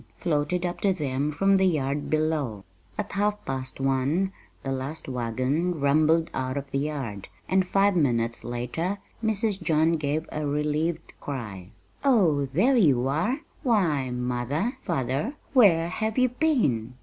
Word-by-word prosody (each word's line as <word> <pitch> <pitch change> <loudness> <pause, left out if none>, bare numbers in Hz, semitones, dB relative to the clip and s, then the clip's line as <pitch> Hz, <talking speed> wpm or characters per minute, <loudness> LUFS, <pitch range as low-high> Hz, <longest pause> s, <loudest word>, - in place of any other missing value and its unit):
floated 170 +2 0
up 175 0 -3
to 200 - +3
them 145 -4 -1
from 195 +6 +3
the 190 - +3
yard 145 -3 -1
below. 155 -9 0 0.3
At 210 - -3
half 210 +1 -1
past 130 0 -4
one 135 +8 +1 0.3
the 135 - -3
last 135 +4 -4
wagon 130 +7 -1
rumbled 155 +3 +3
out 130 +1 -2
of 140 0 -5
the 135 - 0
yard, 135 -9 -4 0.2
and 190 -1 +2
five 195 +1 +3
minutes 115 -8 +1
later 125 - -3 0.3
Mrs. 215 -2 0
John 160 0 +2
gave 150 +1 -2
a 150 -1 -2
relieved 150 +3 -1
cry. 105 -10 -6 0.3
"Oh, 175 - +3
there 220 - +3
you 135 - +4
are! 215 - 0 0.2
Why, 175 - +1
mother, 125 - -2
father, 145 - -1 0.2
where 175 -10 +5
have 220 +5 -2
you 255 0 +4
been?" 185 - +1
150 Hz, 145 wpm, -26 LUFS, 130-190 Hz, 0.3 s, where